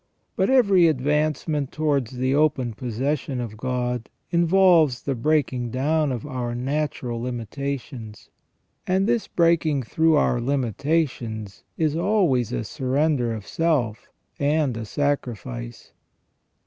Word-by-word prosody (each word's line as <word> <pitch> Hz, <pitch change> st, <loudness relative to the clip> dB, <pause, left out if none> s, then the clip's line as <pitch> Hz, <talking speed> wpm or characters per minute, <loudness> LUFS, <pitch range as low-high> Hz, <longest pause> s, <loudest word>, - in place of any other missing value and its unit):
But 190 Hz, -, +1 dB
every 200 Hz, -10 st, +5 dB
advancement 150 Hz, 0 st, 0 dB
towards 140 Hz, -6 st, 0 dB
the 130 Hz, +1 st, +1 dB
open 140 Hz, -5 st, +1 dB
possession 130 Hz, +4 st, -2 dB
of 115 Hz, -3 st, -5 dB
God 125 Hz, -1 st, -2 dB, 0.2 s
involves 170 Hz, -5 st, +4 dB
the 140 Hz, -, -1 dB
breaking 130 Hz, -2 st, 0 dB
down 150 Hz, +4 st, +1 dB
of 120 Hz, -1 st, -4 dB
our 125 Hz, -4 st, -3 dB
natural 130 Hz, -2 st, -2 dB
limitations, 125 Hz, -1 st, -5 dB, 0.6 s
and 190 Hz, +1 st, +2 dB
this 235 Hz, 0 st, +1 dB
breaking 165 Hz, -5 st, +2 dB
through 160 Hz, +7 st, +2 dB
our 125 Hz, -4 st, +2 dB
limitations 125 Hz, -4 st, -1 dB
is 155 Hz, -2 st, +1 dB
always 170 Hz, -, +2 dB
a -, -, -2 dB
surrender 135 Hz, 0 st, 0 dB
of 110 Hz, -3 st, -5 dB
self 140 Hz, -10 st, -1 dB, 0.3 s
and 145 Hz, -3 st, +1 dB
a 115 Hz, -1 st, -5 dB
sacrifice. 110 Hz, -, -3 dB
140 Hz, 115 wpm, -24 LUFS, 120-155 Hz, 0.6 s, every